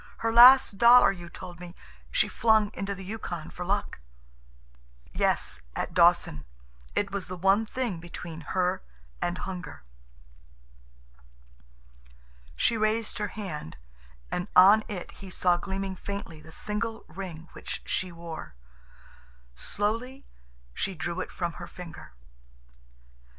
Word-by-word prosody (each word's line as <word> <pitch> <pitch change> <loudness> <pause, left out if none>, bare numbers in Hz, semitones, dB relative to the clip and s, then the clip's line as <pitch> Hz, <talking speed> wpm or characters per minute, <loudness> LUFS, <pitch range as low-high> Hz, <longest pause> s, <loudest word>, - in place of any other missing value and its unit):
Her 225 0 -1
last 245 -3 +8
dollar, 240 -2 +8
you 175 -3 -9
told 175 -1 -9
me, 180 0 -10 0.3
she - - +2
flung 220 -2 +3
into 200 +1 -3
the 195 - -9
Yukon 185 -6 -5
for 180 - -6
luck." 200 - -2 1.1
"Yes, - - 0
at - - -3
Dawson. 170 - +4 0.5
It 200 -1 0
was 200 -2 -3
the 185 0 -6
one 195 +5 +3
thing 235 -8 -2
between 170 -1 -8 0.2
her 180 -1 +1 0.4
and 175 +1 -1
hunger." 175 - -7 2.7
She 225 - +2
raised 215 +1 0
her 210 - -1
hand, 150 - -6 0.5
and 180 - -2
on 200 +4 +8
it 190 -4 -6
he 195 - -11
saw 180 -1 +2
gleaming 190 +1 -4
faintly 185 -5 -6
the 160 +1 -14
single 220 +5 -4
ring 170 -1 -8
which - - -6
she 185 -1 -1
wore. 165 - -8 1.0
Slowly 230 - -2 0.5
she 195 - -2
drew 170 +2 -3
it - - -4
from 175 -2 -3
her 175 - -6
finger. 170 - -10
190 Hz, 125 wpm, -28 LUFS, 175-210 Hz, 2.7 s, last